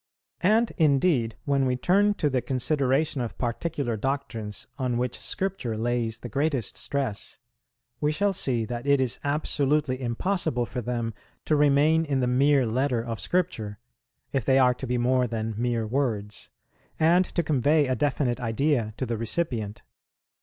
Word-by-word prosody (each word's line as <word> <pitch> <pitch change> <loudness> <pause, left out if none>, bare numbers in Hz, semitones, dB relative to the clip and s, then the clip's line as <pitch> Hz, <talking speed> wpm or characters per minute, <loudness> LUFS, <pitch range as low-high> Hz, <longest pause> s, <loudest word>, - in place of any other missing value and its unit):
And, 220 +5 +3
indeed, 140 -6 +3
when 140 -2 +2
we 125 - +1
turn 200 +9 +3
to 150 - 0
the 130 -3 0
consideration 135 +2 0
of 120 - -5
particular 125 0 -2
doctrines 115 -5 -3
on 125 -2 0
which 125 0 -2
Scripture 185 - -2
lays 115 0 -1
the 120 - -8
greatest 135 -1 -1
stress, 135 -7 -4 0.6
we 150 0 +1
shall 200 +6 +1
see 120 -9 0
that 120 +3 -5
it 140 -1 +4
is 130 -3 -1
absolutely 145 -2 0
impossible 125 0 -1
for 120 +4 -5
them 115 -1 -2 0.3
to 155 - +2
remain 150 +2 +4
in 140 -3 0
the 125 - +1
mere 135 +2 +3
letter 125 +1 0
of 115 -2 -4
Scripture, 115 - -1 0.6
if 135 -3 +1
they 135 +3 +3
are 125 -2 +5
to 130 +1 -7
be 125 0 0
more 125 +1 +2
than 110 -1 -3
mere 115 0 -1
words, 110 -4 -2 0.5
and 170 +3 +5
to 170 - -2
convey 150 +1 +3
a 130 - 0
definite 130 -1 0
idea 120 -1 0
to 130 - -2
the 115 -2 -3
recipient. 115 -4 -2
130 Hz, 160 wpm, -26 LUFS, 120-150 Hz, 0.6 s, are